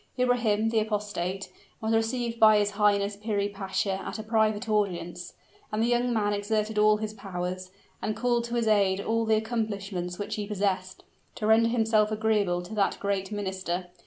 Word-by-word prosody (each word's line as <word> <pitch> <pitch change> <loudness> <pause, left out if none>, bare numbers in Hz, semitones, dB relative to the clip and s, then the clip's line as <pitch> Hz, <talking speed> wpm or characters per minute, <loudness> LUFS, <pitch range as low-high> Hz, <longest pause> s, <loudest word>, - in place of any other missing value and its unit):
Ibrahim, 235 -4 +2
the 225 -1 +2
apostate, 205 -3 -3 0.3
was 220 0 -1
received 230 +1 0
by 215 -1 +7
his 205 0 +1
highness 200 0 +2
Piri 205 -1 -1
Pasha 195 -1 -2
at - - -5
a 220 - -5
private 220 0 +1
audience 180 -5 -1 0.4
and 215 - -2
the 235 - +2
young 245 +1 +2
man 210 -3 +1
exerted 210 +1 -1
all 210 0 +5
his 215 0 -4
powers, 185 -2 -5 0.3
and 215 - -2
called 240 -1 +1
to 235 0 -4
his 235 -2 +1
aid 200 -3 +3
all 225 +2 0
the 220 0 +3
accomplishments 200 -5 -3
which 205 - -4
he 205 -1 -3
possessed, 195 -2 -2 0.3
to 215 - -4
render 225 +1 +5
himself 220 -2 +2
agreeable 210 -5 +1
to 180 - -9
that 205 -2 +1
great 200 -1 -2
minister. 190 -3 -3
210 Hz, 175 wpm, -27 LUFS, 195-220 Hz, 0.4 s, by